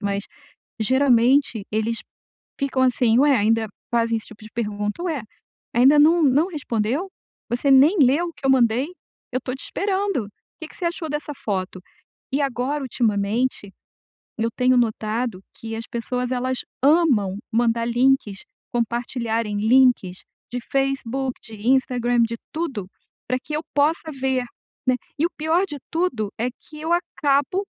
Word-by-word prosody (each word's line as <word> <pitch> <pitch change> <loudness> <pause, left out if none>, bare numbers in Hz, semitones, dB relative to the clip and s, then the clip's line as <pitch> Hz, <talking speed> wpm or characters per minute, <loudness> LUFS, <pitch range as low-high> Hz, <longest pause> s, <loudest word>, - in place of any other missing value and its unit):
mas 200 -1 -1 0.6
geralmente 255 -1 +3
eles 220 +2 0 0.6
ficam, 275 -2 0
assim: 245 -3 +3
"Ué", 285 -1 +5
ainda 220 0 +2 0.2
fazem 230 -1 +2
esse 220 - -6
tipo 220 -1 -14
de 215 - -11
pergunta: 210 +3 -3
"Ué, 315 -8 -2 0.5
ainda 265 +5 +6
não 325 +3 +6
não 290 +4 +4
respondeu?". 270 - -2 0.4
"Você 245 +4 +1
nem 285 +9 +6
leu 285 +6 +4
o - - -8
que 275 - -6
eu - - +5
mandei?", 250 0 +3 0.5
"Eu 255 - 0
tô 255 0 -4
te 265 - -7
esperando, 390 - -1 0.3
que 320 - -6
que - - -16
você - - -6
achou 340 -1 -3
dessa 295 0 -3
foto?". 190 -6 -3 0.5
E 275 - +1
agora 275 +2 -1
ultimamente, 220 -2 0 0.7
eu 225 +1 0
tenho 255 0 +3
notado 220 -2 -1
que 225 0 -6
as 225 +1 -5
pessoas 250 +2 -3
elas 255 0 -1 0.2
amam 270 - +3
mandar 230 0 +2
links, 240 -4 +2 0.3
compartilharem 230 -2 -1
links 220 -4 +3 0.3
de 245 - -2
Facebook, 270 -1 0
de 220 0 -8
Instagram, 245 -2 +2
de 230 0 -1 0.2
tudo, 275 - -3 0.4
pra 255 +1 +1
que 300 - -7
eu 305 - -1
possa 310 +2 +1
ver, 265 -2 -1 0.4
né, 255 - +4 0.2
e 315 - +3
o - - +1
pior 320 +5 +2
de 295 - -6
tudo, 260 - -1
é 240 +2 0
que 305 +4 -13
eu 320 +2 -2
acabo 325 0 +1
250 Hz, 150 wpm, -23 LUFS, 225-285 Hz, 0.7 s, ainda